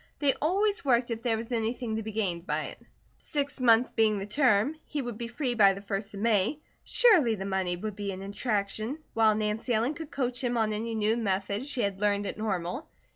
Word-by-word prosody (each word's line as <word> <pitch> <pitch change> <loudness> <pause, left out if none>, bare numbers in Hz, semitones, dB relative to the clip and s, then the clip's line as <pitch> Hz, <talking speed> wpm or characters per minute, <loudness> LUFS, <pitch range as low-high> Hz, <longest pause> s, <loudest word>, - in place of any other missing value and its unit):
They 280 -2 +3
always 400 +7 +1
worked 245 -3 +2
if 225 0 -3
there 230 -2 +1
was 230 +2 -6
anything 230 0 -1
to - - -2
be 220 0 -5
gained 190 -5 -2
by - - 0
it. - - -8 0.4
Six 285 -2 -3
months 235 0 +5
being 220 -2 +2
the 195 - -4
term, 250 +3 +3
he 300 - -3
would 240 -4 -4
be 235 - -3
free 245 +1 -2
by 200 -4 +5
the 195 - -8
first 200 +1 -4
of 200 - -6
May; 220 +4 +2 0.3
surely 355 - +4
the 195 -1 -5
money 190 -2 -1
would 210 +3 -5
be 200 -1 -3
an 190 0 -7
attraction, 215 +4 -2 0.2
while 220 -1 +4
Nancy 215 +3 -1
Ellen 235 +7 +1
could 310 0 -8
coach 250 -2 -2
him 245 -1 0
on 220 -1 +1
any 225 +2 -3
new 220 +1 +2
methods 200 +3 -1
she 260 - -1
had 200 -1 -2
learned 205 -1 +1
at - - -3
Normal. 215 - -3
220 Hz, 220 wpm, -28 LUFS, 205-250 Hz, 0.4 s, months